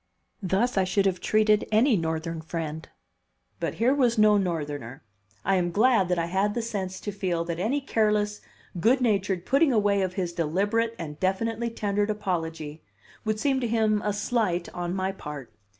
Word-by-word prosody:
Thus 195 +4 +1
I - - +3
should 190 +2 +1
have 185 -2 +1
treated 215 +2 +2
any 230 +3 +4
Northern 160 -1 -2
friend; 160 -1 -5 0.7
but - - -2
here 245 +4 +3
was 245 -5 +2
no 215 0 +6
Northerner. 145 - -3 0.4
I 195 0 +3
am 175 -1 +1
glad 210 0 +3
that 180 - +1
I 170 - 0
had 195 +4 0
the 240 - 0
sense 195 -5 -4
to 205 - -4
feel 185 -4 -1
that 170 0 -4
any 250 +10 0
careless, 210 -4 0 0.4
good 240 +9 +4
natured 200 -6 0
putting 275 +2 +3
away 205 -3 +2
of 185 -1 -2
his 180 -3 -2
deliberate 205 +8 0
and 150 -3 -7
definitely 225 +5 0
tendered 205 -2 -1
apology 165 -7 -3 0.4
would 215 0 -1
seem 270 +2 +1
to 245 - -1
him 220 -2 +2
a 210 - +1
"slight" 205 -4 -1
on 175 0 -3
my 190 0 -1
part. 150 - -8
195 Hz, 175 wpm, -26 LUFS, 170-220 Hz, 0.7 s, no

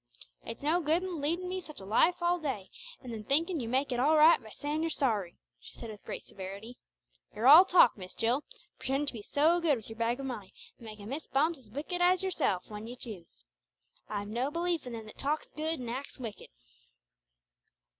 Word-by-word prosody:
"It's 230 +4 -7
no 325 +4 +2
good 325 +3 +1
leading 345 0 -2
me 370 +1 -3
such 305 -3 -11
a 190 - -10
life 325 - +3
all 350 +1 +2
day, 260 - -4 0.3
and 245 -2 -6
then 215 -1 -6
thinking 320 - +1
you 230 -3 -4
make 265 +3 +1
it 245 - 0
all 305 +5 +4
right 310 -1 +7
by 220 - -12
saying 295 +7 -3
you're 330 - 0
sorry," 215 - 0 0.2
she - - -14
said 230 - -7
with 210 - -12
great - - -6
severity. 200 +5 -9 0.6
"You're 225 +4 +1
all 320 +7 +11
talk, 350 -10 +6
Miss 185 -1 -9
Jill! 245 +6 +1 0.4
pretending 275 +2 -1
to 280 - -1
be 225 - -7
so 315 +10 +3
good 315 -4 +3
with 225 -3 -9
your 225 +1 -10
bag 235 +2 0
of 275 - -4
money, 215 -8 -6 0.2
and 230 - -11
making 210 -1 -9
Miss 290 +4 -5
Bumps 310 +3 +1
as 235 -5 -18
wicked 305 - -3
as 365 +1 +4
yourself 280 - 0
when 210 +1 -7
you 245 - -7
choose! 205 -9 -10 0.7
I've 205 -1 -3
no 240 +6 -1
belief 335 -2 -1
in 245 - -6
them 225 -1 -6
that 215 - -13
talks 300 +2 -1
good, 315 0 -1
and 245 - -6
acts 260 +4 -5
wicked!" 230 -6 -7
270 Hz, 215 wpm, -31 LUFS, 225-320 Hz, 0.7 s, all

